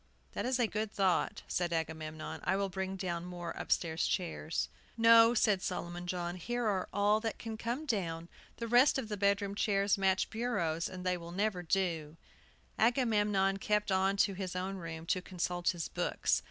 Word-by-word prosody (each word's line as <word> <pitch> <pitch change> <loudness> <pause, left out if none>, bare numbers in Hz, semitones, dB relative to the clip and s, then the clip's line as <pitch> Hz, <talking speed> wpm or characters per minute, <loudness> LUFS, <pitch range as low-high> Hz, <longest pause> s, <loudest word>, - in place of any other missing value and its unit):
"That - - -2
is 255 0 +1
a 245 - +3
good 215 -1 -2
thought," 190 -4 +1
said 175 -1 -1
Agamemnon. 160 -1 -4
"I - - +1
will 195 0 0
bring 190 +1 -3
down 175 -3 -3
more 175 -1 -6
upstairs 165 -1 0
chairs." 165 -3 -2 0.3
"No," 230 +1 +7
said 210 -4 +3
Solomon 175 -1 -4
John; 175 0 -3
"here 240 +6 -2
are 195 -4 0
all 205 +2 +3
that 225 0 -3
can 225 -1 -6
come 235 +7 -3
down; 170 - -2 0.3
the 230 - -4
rest 245 +5 +5
of 225 -5 -4
the 210 - -2
bedroom 200 0 +1
chairs 200 -1 +1
match 190 -1 +2
bureaus, 175 -9 -1
and 185 -1 -8
they 180 -1 +1
never 180 +3 -2
will 175 - -9
do!" 165 -4 0 0.6
Agamemnon 210 -5 +2
kept 210 0 0
on 190 +1 +2
to 200 0 +3
his 185 -1 -5
own 190 +2 -3
room, 165 -2 -7
to 185 +2 0
consult 175 -1 -1
his 170 -3 -2
books. - - 0
190 Hz, 180 wpm, -33 LUFS, 175-215 Hz, 0.6 s, No